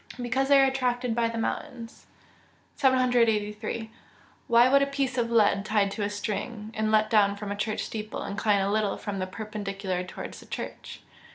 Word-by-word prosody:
_ 250 - -8
Because 265 +3 0
they 280 0 +6
are 270 - +6
attracted 250 -2 0
by 230 0 +1
the 230 - -5
mountains. 230 0 -5 0.7
783. 230 -4 +1 0.6
_Why 240 +2 +6
would 275 0 +6
a 280 - +2
piece 275 -2 -1
of 235 -2 0
lead 205 -4 +3
tied 205 -2 +1
to 210 - -5
a 205 - 0
string, 210 +2 -4
and 215 0 -1
let 215 0 +4
down 205 -2 +4
from 205 0 -6
a - - -2
church 210 +1 -2
steeple, 215 -1 -5
incline 200 0 +1
a 195 +1 0
little 210 -1 0
from 200 -2 -5
the 185 - -2
perpendicular 195 -3 -4
towards 180 - -8
the - - -15
church? - - -7
220 Hz, 185 wpm, -27 LUFS, 205-245 Hz, 0.7 s, they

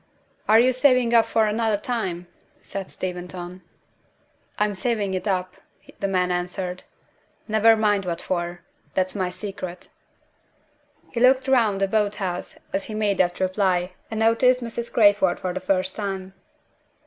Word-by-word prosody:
"Are 220 +1 +7
you 255 +2 +4
saving 255 -2 +3
it - - -1
up 230 -1 +6
for 220 -1 +2
another 215 0 +1
time?" 195 -6 -3 0.4
said 195 -1 -6
Steventon. 180 0 -6 1.0
"I'm 210 0 +1
saving 200 0 -1
it 185 +3 -3
up," 185 -2 -1 0.4
the 200 - 0
man 180 -2 +1
answered. 180 +1 -3 0.6
"Never 220 +1 +5
mind 205 -3 +1
what 170 -1 -2
for. 175 -1 -3 0.3
That's 185 0 +1
my 185 -3 -1
secret." 185 -2 -7 1.2
He 235 - -3
looked 260 +2 +4
round 230 -7 +3
the 195 - +2
boat 210 0 +1
house 180 -3 -4 0.2
as 195 - -1
he 215 - -6
made 210 -2 0
that 175 -1 +1
reply, 185 -1 +1 0.2
and 220 0 -3
noticed 250 +3 +4
Mrs. 235 0 -5
Crayford 205 -4 +4
for 185 -2 -3
the 185 - -3
first 185 0 0
time. 195 -2 -4
195 Hz, 150 wpm, -24 LUFS, 185-220 Hz, 1.2 s, Are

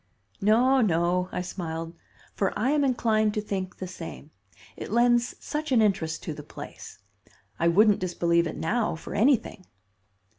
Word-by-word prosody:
"No, 245 +6 +4
no," 180 -2 +1
I 180 - -3
smiled, 165 -2 -5 0.4
"for 195 - -1
I 240 +6 +1
am 295 -1 +2
inclined 220 -5 +1
to - - +1
think 190 -3 -4
the 185 - -5
same; 165 -4 -9 0.4
it - - -7
lends 240 +1 +3
such 305 -1 -4
an 250 - +5
interest 190 -7 0
to 160 - -4
the 150 - -8
place. - - -10 0.6
I 170 - +2
wouldn't 205 +4 +5
disbelieve 170 -2 +1
it 160 - -6
now 215 +3 0
for 165 - -9
anything." 225 -5 +1
195 Hz, 155 wpm, -26 LUFS, 170-235 Hz, 0.6 s, an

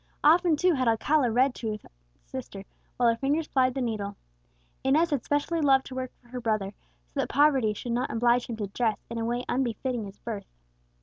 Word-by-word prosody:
Often 335 +2 +5
too 360 +4 +3
had 260 -4 0
Alcala 245 +4 +3
read 245 +3 +5
aloud 270 -1 0
to 230 - -4
his 210 -1 -5 0.4
sister, - - -7 0.3
while 245 - +3
her 230 - +2
fingers 285 +6 0
plied 255 -1 +2
the 265 - -1
needle. 205 -4 -3 0.7
Inez 310 +5 +3
had 280 -5 0
specially 290 +3 0
loved 270 -2 +4
to - - -8
work 255 -1 -4
for 240 - -24
her 250 0 -5
brother, 215 -3 -1 0.4
that - - 0
so - - -2
poverty 265 -7 +3
should 240 - -5
not 245 +2 0
oblige 240 +1 +2
him 230 - -5
to 210 - -2
dress 220 +2 0
in 230 - -3
a 225 - -1
way 240 +2 -2
unbefitting 245 -2 -1
his 195 0 -10
birth. 210 -4 -6
245 Hz, 210 wpm, -27 LUFS, 225-275 Hz, 0.7 s, Often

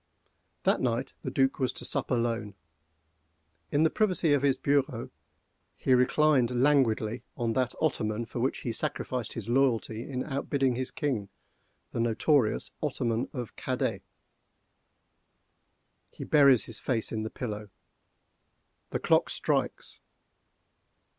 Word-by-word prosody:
That - - +2
night - - -1
the - - -4
Duc 135 0 +1
was 130 -2 +1
to - - -5
sup - - 0
alone. 115 -4 -1 1.2
In 145 +2 +3
the 160 - +3
privacy 185 -8 +2
of 145 - +3
his 140 -2 +2
bureau 135 -4 0 0.6
he 130 - +1
reclined 125 -1 +3
languidly 120 -5 +2 0.2
on 115 -3 0
that 130 -1 0
ottoman 115 -7 0
for 115 - -6
which 130 +3 -1
he 120 - -2
sacrificed 120 +1 -3
his 115 -2 -6
loyalty 120 -2 +1
in 130 -2 -2
outbidding 135 -2 0
his 130 +1 -2
king—the 120 -3 -6
notorious 115 +2 +2
ottoman 115 +1 -1
of 125 -5 -6
Cadêt. 125 -6 -2 2.1
He - - -9
buries 140 -5 +5
his 115 - -6
face 115 -4 -1
in 110 - -2
the 110 - -3
pillow. 105 -4 -5 1.2
The - - -2
clock - - +3
strikes! - - -2
125 Hz, 125 wpm, -29 LUFS, 115-140 Hz, 2.1 s, buries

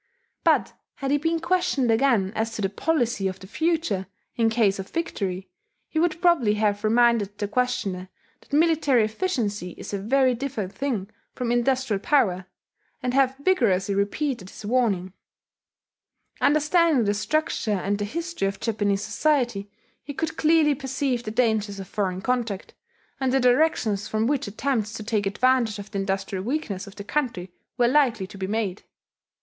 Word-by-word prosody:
But - - +3 0.2
had 275 0 -3
he 290 - +3
been 325 +2 0
questioned 330 -8 +1
again 225 -5 +2
as 225 +1 -2
to 215 - -4
the 195 - +1
policy 240 -6 0
of 190 0 -5
the - - -11
future, 315 - -1 0.3
in 225 -1 +3
case 220 -4 +2
of 190 - -6
victory, 195 - -3 0.4
he 315 - -1
would 335 -1 +1
probably 320 -13 +3
have 205 -1 0
reminded 225 -2 +3
the 205 - -2
questioner 200 -6 -1 0.3
that - - -25
military 295 -5 +3
efficiency 215 - -2
is - - -8
a 200 - -1
very 255 +5 +3
different 235 -6 -4
thing 240 -9 -2 0.3
from 245 -2 -2
industrial 240 -3 +1
power, 190 -8 +1 0.6
and 250 0 -1
have 265 -1 +3
vigorously 200 - +2
repeated 200 +1 -1
his 205 - -11
warning. 205 -6 +1 1.3
Understanding 305 -1 +3
the 205 -1 +1
structure 310 +3 -1
and 200 0 0
the 205 - -1
history 335 - -3
of 195 - -4
Japanese 205 -3 0
society, 240 -3 0 0.3
he 285 -1 -7
could 320 +2 -2
clearly 315 -2 +4
perceive 265 -2 -2
the 215 - -5
dangers 220 -3 0
of 190 - -7
foreign 185 -2 -2
contact, 235 -6 -2 0.5
and 265 -1 +1
the 270 - +3
directions 245 -6 +2
from 220 0 0
which 270 -2 0
attempts 220 0 -1
to 220 - -6
take 210 -2 0
advantage 235 +1 +2
of 205 0 -9
the 200 - -2
industrial 195 -1 -2
weakness 215 -6 -3
of 200 - -12
the 200 - -7
country 205 -8 -2 0.2
were 240 -1 +4
likely 245 -7 +3
to 195 +1 -12
be 190 - -2
made.... 205 -2 -2
225 Hz, 165 wpm, -25 LUFS, 200-275 Hz, 1.3 s, clearly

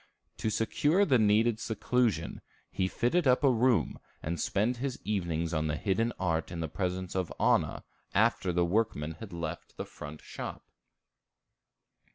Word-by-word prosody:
To 110 - -1
secure 150 - +2
the 130 -8 +4
needed 110 +2 +3
seclusion, 110 -5 0 0.3
he 95 -1 0
fitted 135 - +1
up 130 +3 +4
a 135 - +6
room, 120 0 +2 0.2
and 85 +2 -2
spent 110 +5 +1
his 130 +1 -3
evenings 85 -5 -1
on 80 -1 0
the 75 - 0
hidden 110 +8 0
art 80 -3 0
in 85 - -5
the 80 - -1
presence 90 +2 -3
of 95 -2 -1
Anna, - - +2 0.3
after 105 -3 +3
the 85 0 +2
workmen 85 -6 0
had 110 -3 -8
left 85 -2 -6
the - - -4
front 75 +1 -9
shop. - - -7
100 Hz, 155 wpm, -30 LUFS, 85-120 Hz, 0.3 s, a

